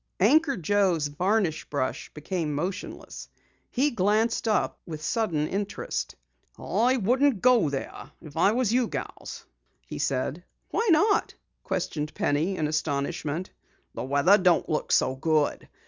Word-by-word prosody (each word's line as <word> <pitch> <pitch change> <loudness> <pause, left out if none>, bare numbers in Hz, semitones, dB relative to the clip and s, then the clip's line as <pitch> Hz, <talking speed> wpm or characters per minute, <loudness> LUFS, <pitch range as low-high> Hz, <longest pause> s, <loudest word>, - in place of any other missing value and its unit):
Anchor 275 - +4
Joe's 180 -4 +1
varnish 180 +1 0
brush 140 -3 -2
became 155 -1 -3
motionless. 185 +7 -5 0.4
He 285 +4 +1
glanced 215 +3 +1
up 215 - 0
with 155 -3 -8
sudden 165 -6 0
interest. 195 - -3 0.4
"I 235 +9 +1
wouldn't 250 +2 +2
go 245 - +5
there 140 -1 -6
if 150 -3 -13
I 180 +5 +4
was 240 -2 +1
you 250 -1 +2
gals," 135 -8 -7 0.4
he - - -7
said. 135 +5 -1 0.3
"Why 455 -1 0
not?" 405 +7 +3 0.3
questioned 150 -1 -3
Penny 155 +7 0
in 155 - 0
astonishment. 155 +2 -2 0.4
"The - - -5
weather 140 +10 +4
don't 180 -2 +3
look 155 - -2
so 130 - +3
good. 155 +1 0
180 Hz, 130 wpm, -26 LUFS, 150-220 Hz, 0.4 s, go